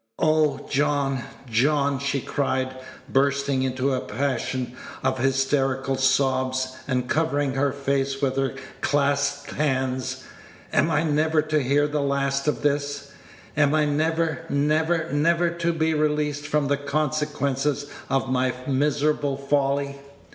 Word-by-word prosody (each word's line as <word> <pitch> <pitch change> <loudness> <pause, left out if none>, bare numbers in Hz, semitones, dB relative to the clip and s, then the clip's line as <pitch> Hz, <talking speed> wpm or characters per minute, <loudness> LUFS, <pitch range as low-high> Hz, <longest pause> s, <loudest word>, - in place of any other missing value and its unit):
"Oh, 155 -3 +2
John, 140 -2 +1 0.3
John!" 140 +4 +2
she 140 0 -1
cried, 130 -1 -1 0.3
bursting 140 0 +1
into 130 +1 0
a 130 - 0
passion 125 0 -2 0.3
of 130 -1 0
hysterical 135 0 +1
sobs, 130 -1 +1
and 125 -2 0
covering 145 -2 +1
her 135 +1 +1
face 135 0 -1
with 135 -2 0
her 135 -1 0 0.3
clasped 140 0 +1
hands, 130 -3 -1 0.5
"am 155 - +3
I 160 0 +2
never 155 0 +2
to 155 -1 +1
hear 140 +3 +2
the 150 0 -1
last 140 0 0
of 150 - 0
this? 145 -1 -1 0.4
Am 145 0 +3
I 155 -1 +3
never, 160 +2 0
never, 160 +3 +1
never 170 +3 +2
to 170 0 0
be 160 -1 +1
released 150 -1 0
from 150 -1 +1
the 140 0 +1
consequences 145 -1 -1 0.2
of 135 0 +1
my 130 -1 +1
miserable 145 0 +1
folly?" 140 0 0
140 Hz, 130 wpm, -24 LUFS, 135-150 Hz, 0.5 s, am